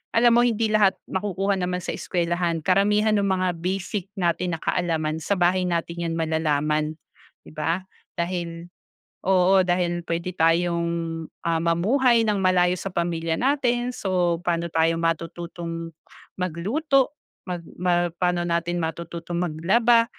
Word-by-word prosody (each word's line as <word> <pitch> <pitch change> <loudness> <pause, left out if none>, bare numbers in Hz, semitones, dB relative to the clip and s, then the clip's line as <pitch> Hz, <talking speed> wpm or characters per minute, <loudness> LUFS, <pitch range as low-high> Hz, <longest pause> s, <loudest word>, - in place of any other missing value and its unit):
alam 235 +1 +6
mo 240 +1 +5
hindi 225 -1 0
lahat 205 -3 +4 0.2
makukuha 195 0 -1
naman 180 0 -2
sa - - -3
eskwelahan. 170 -2 -1
Karamihan 210 +4 +3
nung 200 -2 +2
mga 185 -1 +1
basic 190 +2 -3
natin 175 -2 0
na - - -9
kaalaman, 160 -3 0
sa 200 +6 0
bahay 180 +1 +2
natin 170 0 -2
yan 165 - -2
malalaman, 155 -1 0 0.5
di 80 - -14
ba, 165 - -1 0.3
dahil 170 -1 -4 0.6
oo, 190 0 +5
dahil 175 -1 0
puwede 170 +2 -2
tayong, 170 -1 0 0.2
ah, 165 -1 +1
mamuhay 225 +9 +3
nang 210 -2 +1
malayo 180 -1 +3
sa - - -4
pamilya 165 -1 -1
natin. 250 - +1
So, 180 -6 0
paano 170 -1 -1
tayo 165 0 +2
matututong 165 0 -3 0.5
magluto, 250 - +1 0.3
magma 175 -1 -1
paano 180 -1 +1
natin 170 0 -1
matututong 170 +1 -4
maglaba, 210 +9 +3
175 Hz, 130 wpm, -24 LUFS, 165-190 Hz, 0.6 s, alam